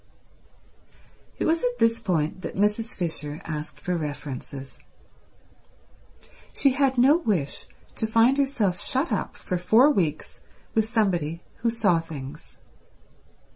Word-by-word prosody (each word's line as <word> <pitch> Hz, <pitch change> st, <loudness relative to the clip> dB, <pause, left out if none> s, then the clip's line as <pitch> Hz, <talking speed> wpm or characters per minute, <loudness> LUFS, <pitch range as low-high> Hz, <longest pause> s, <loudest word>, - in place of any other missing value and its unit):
It -, -, -1 dB
was 325 Hz, +1 st, +2 dB
at 245 Hz, 0 st, -1 dB
this 230 Hz, -1 st, +3 dB
point 165 Hz, -1 st, -1 dB
that -, -, -6 dB
Mrs. 210 Hz, +3 st, 0 dB
Fisher 160 Hz, -4 st, -3 dB
asked 155 Hz, -1 st, -5 dB
for 180 Hz, -, -2 dB
references. 145 Hz, -3 st, -6 dB, 1.8 s
She 275 Hz, -, +4 dB
had 265 Hz, 0 st, +1 dB
no 270 Hz, +6 st, +6 dB
wish 195 Hz, -, -2 dB, 0.3 s
to 220 Hz, -, -1 dB
find 230 Hz, +5 st, +4 dB
herself 235 Hz, -10 st, +1 dB
shut 270 Hz, +6 st, 0 dB
up -, -, -2 dB
for 180 Hz, -, -3 dB
four 230 Hz, +11 st, +5 dB
weeks 170 Hz, -, -1 dB, 0.3 s
with 220 Hz, -1 st, +2 dB
somebody 175 Hz, -8 st, 0 dB
who 235 Hz, -, 0 dB
saw 220 Hz, -7 st, +2 dB
things. 145 Hz, -5 st, -9 dB
205 Hz, 125 wpm, -25 LUFS, 160-245 Hz, 1.8 s, no